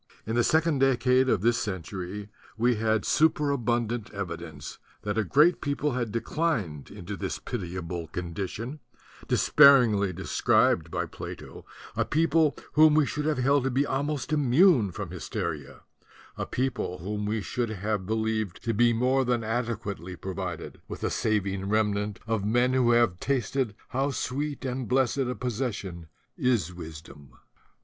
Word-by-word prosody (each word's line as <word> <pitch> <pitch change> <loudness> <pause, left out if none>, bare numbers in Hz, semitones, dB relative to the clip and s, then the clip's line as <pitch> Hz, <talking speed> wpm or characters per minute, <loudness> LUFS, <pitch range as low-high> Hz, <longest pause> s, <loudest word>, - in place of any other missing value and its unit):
In 110 - -3
the 120 - +3
second 160 +2 +2
decade 130 0 +3
of - - +2
this 120 +2 +2
century 95 +1 -5 0.3
we 120 +1 +2
had 110 -1 +1
superabundant 120 -7 +1
evidence 100 -4 -7 0.2
that 105 -1 -2
a 110 - +1
great 150 - +4
people 145 +1 -1
had 120 -3 -2
declined 115 - -2
into 100 0 -7
this 85 - -3
pitiable 85 -2 -5
condition, 95 - -5 0.5
despairingly 120 -9 +5
described 90 +1 +2
by - - -2
Plato, - - -9 0.3
a - - +2
people 160 0 +2 0.2
whom 155 0 +6
we 155 -1 +4
should 150 +2 -3
have 155 -3 +1
held 135 +2 +3
to - - +2
be 135 +3 +1
almost 145 +1 -2
immune 140 - +4
from - - -6
hysteria, 75 -4 -5 0.5
a - - -4
people 125 -8 -2
whom 105 +4 -4
we 110 +1 0
should 120 +2 -2
have 105 -2 -2
be 110 - 0
lieved 110 -3 -1
to 115 -1 0
be 120 +2 +4
more 130 +3 +2
than 120 -2 0
adequately 110 -6 -3
provided 90 -2 -6
with - - -7
a - - 0
saving 100 -2 -1
remnant 105 -1 0
of 110 -3 -1
men 120 +4 +2
who 130 -2 +3
have 120 -7 +3
tasted 130 -3 -1
how 135 +2 0
sweet 140 +1 -3
and 130 -1 -3
blessed 130 +1 +2
a 125 -1 0
possession 105 -9 -4 0.3
is 115 -9 +1
wisdom. 80 -4 -11
115 Hz, 150 wpm, -27 LUFS, 100-135 Hz, 0.5 s, whom